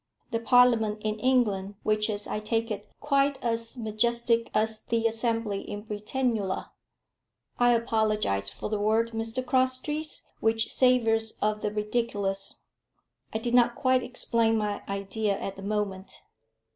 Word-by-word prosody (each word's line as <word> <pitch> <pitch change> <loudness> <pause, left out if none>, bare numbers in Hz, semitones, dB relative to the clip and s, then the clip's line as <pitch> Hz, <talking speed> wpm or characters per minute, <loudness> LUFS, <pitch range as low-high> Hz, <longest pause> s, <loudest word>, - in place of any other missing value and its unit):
The 230 - 0
Parliament 230 -3 +4
in 215 0 -1
England, 210 -6 +1
which 215 0 +2
is, 205 -1 -3
I - - -3
take 225 +1 -1
it, 210 - -5
quite 280 -1 +2
as 230 +1 -2
majestic 230 +1 +1
as 220 0 0
the 230 0 0
Assembly 225 -3 0
in 205 0 -7
Britannula 215 -1 -2 0.4
" - - -58
"I 245 0 +5
apologise 215 - +1
for - - -6
the 210 -1 -2
word, 220 +2 +2
Mr 225 +3 -3
Crosstrees, 260 +4 -1
which 225 0 +1
savours 225 -3 +3
of 210 0 0
the 210 - -1
ridiculous. 210 -2 -2 0.7
I - - -1
did 235 +2 -3
not 240 -1 +4
quite 255 -1 +2
explain 230 -2 +1
my 210 -1 -2
idea 200 +1 -1
at 195 - -5
the 195 - -10
moment." 200 -2 -3
225 Hz, 145 wpm, -27 LUFS, 210-240 Hz, 0.7 s, I